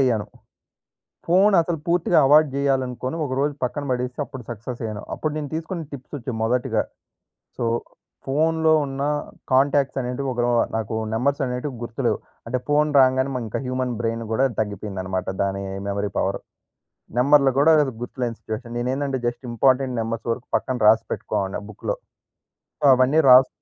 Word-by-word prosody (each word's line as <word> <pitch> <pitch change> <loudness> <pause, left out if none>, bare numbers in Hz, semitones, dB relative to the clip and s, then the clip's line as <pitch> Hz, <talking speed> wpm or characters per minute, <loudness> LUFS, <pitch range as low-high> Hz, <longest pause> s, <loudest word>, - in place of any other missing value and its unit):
అయ్యాను. 120 -6 +2 1.0
ఫోనసలు 175 -2 +4
పూర్తిగా 170 -1 +3
అవాయిడ్ 150 0 +5
జేయాలనుకుని, 130 -1 -1
ఒకరోజు 140 +2 -1
పక్కన 135 +4 -1
బడేసి 125 +1 -2
అప్పుడు 130 0 -9
సక్సెస్ 120 +2 -6
అయ్యాను. 110 -2 -4
అప్పుడు 155 - -2
నేను 150 -2 -3
తీసుకున్న 165 +2 -4
టిప్స్ 135 +1 -9
ఒచ్చి 125 +1 -5
మొదటిగా 120 +2 +1 0.8
సో - - -1 0.6
ఫోన్‌లో 160 +3 +2
ఉన్న 135 0 -4 0.5
కాంటాక్ట్స్ 135 +1 +3
అనేటివి 125 +2 -3
ఒకనో 120 0 0 0.3
నాకు 110 0 -3 0.2
నంబర్సనేటివి 130 +1 -1
గుర్తులేవు. 115 -1 -1 0.3
అంటే 125 +2 -1
ఫోన్ 150 +1 +3
రాంగానే 130 +1 +3
మానింకా 115 -4 -3
హ్యూమన్ 130 -1 -1
బ్రైన్ 115 0 -1
గూడా 130 +4 +3
దగ్గిపోయిందనమాట 95 -3 -3 0.2
దాని 100 0 -1 0.3
మెమరీ 100 0 -2
పవర్. - - 0 0.8
నెంబర్‌లు 140 +1 +5
గూడా 155 +3 +6 0.3
గుర్తులేని 120 -2 -4
సిచ్యుయేషన్ 115 +2 -6
నేనేందంటే 130 +2 -1
జస్ట్ 120 +2 -3
ఇంపార్టెంట్ 130 +1 +2
నంబర్స్ 115 +1 -4
వరకు 115 +1 -6
పక్కన 130 - -2
రాసి 110 +1 +6
పెట్టుకోవడిని 95 0 -2
బుక్కులో. 105 - -4 0.8
సో - - -1
అవన్నీ 130 +5 +3
రాస్ 130 +1 +8
130 Hz, 135 wpm, -23 LUFS, 115-140 Hz, 1.0 s, రాస్